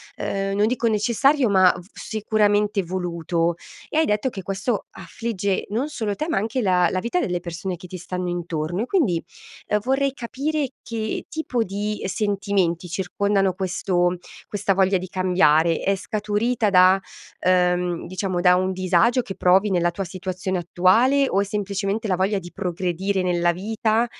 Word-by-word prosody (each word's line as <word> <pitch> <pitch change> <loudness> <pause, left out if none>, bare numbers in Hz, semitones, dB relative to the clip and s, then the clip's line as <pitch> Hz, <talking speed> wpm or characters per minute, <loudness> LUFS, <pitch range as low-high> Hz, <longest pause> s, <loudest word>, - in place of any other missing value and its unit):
ehm, 195 0 -2
non 210 +1 +3
dico 235 0 0
necessario 235 +4 +2
ma 185 -2 +5
v 180 - -8
sicuramente 210 -2 +1
voluto. 170 -1 -1 0.3
E, - - -2
hai 315 - +4
detto 210 +5 0
che 195 -6 -8
questo 195 +4 -2
affligge 200 -5 -3
non 235 +8 -1
solo 220 -9 -2
te 310 - -3
ma - - 0
anche 225 +5 -1
la 180 -3 +3
la 185 - 0
vita 235 - -1
delle 180 - -1
persone 175 +1 -5
che 180 - -11
ti 185 - -7
stanno 180 +1 -4
intorno. 175 +1 -3
E - - -3
quindi 245 - +1 0.6
vorrei 270 +1 +1
capire 280 +4 -2 0.2
che 220 -2 -4
tipo 280 -6 -1
di 205 +2 -3
sentimenti 195 -3 0
circondano 195 +2 0
questo 180 -1 0 0.3
questa 205 0 -6
voglia 190 0 +3
di 185 +1 -6
cambiare. 170 -3 +3
È 195 - +1
scaturita 215 +4 -1
da 185 0 +6 0.4
ehm, 180 -1 +1
diciamo 185 -1 -2
da 180 0 +6
un 185 +1 0
disagio 185 +7 +2
che 195 -5 -7
provi 190 +3 +3
nella 175 -1 +2
tua 195 +3 -4
situazione 185 +1 -4
attuale? 230 +11 +3
O 195 - +1
è - - +1
semplicemente 200 +1 -2
la 185 - +2
voglia 195 +2 +1
di 175 -1 -11
progredire 185 +1 -2
nella 175 -1 +2
vita? 220 +4 0
195 Hz, 160 wpm, -23 LUFS, 180-215 Hz, 0.6 s, da